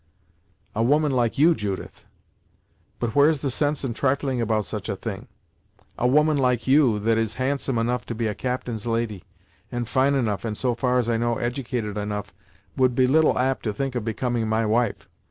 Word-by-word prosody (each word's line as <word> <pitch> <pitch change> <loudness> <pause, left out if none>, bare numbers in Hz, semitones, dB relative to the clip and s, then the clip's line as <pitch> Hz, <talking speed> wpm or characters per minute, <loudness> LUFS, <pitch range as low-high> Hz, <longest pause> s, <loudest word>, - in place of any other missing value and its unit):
"A 110 - -1
woman 145 +5 +3
like 120 -3 0
you, 160 +5 +6
Judith! 100 - -5 0.9
But 120 -2 -2
where's 145 0 +4
the 140 - -1
sense 145 +3 0
in 120 - -2
trifling 135 0 0
about 110 -2 0
such 105 -1 -5
a 100 - -1
thing? 105 +3 -6 0.7
A 125 - +1
woman 150 +2 +3
like 125 -3 +1
you, 130 -5 +4
that 110 +2 +1
is 110 -1 -1
handsome 135 -1 -1
enough 120 +1 -1
to 115 - -4
be 115 +1 -2
a 105 - 0
captain's 120 -2 -4
lady, 115 -5 -2 0.5
and 120 -1 -3
fine 135 +3 +2
enough, 110 -7 -1
and 110 -2 -3
so 125 -2 0
far 125 +1 0
as 120 -2 +1
I 115 -1 +1
know 120 0 0
edicated 120 -4 -3
enough, 105 -1 -4 0.4
would 130 -2 +2
be 130 - +4
little 155 +5 +3
apt 130 +1 +1
to 105 - -1
think 135 +2 -2
of 120 -3 -2
becoming 115 +1 -1
my 110 +1 +1
wife. 115 0 0
120 Hz, 190 wpm, -24 LUFS, 110-130 Hz, 0.9 s, you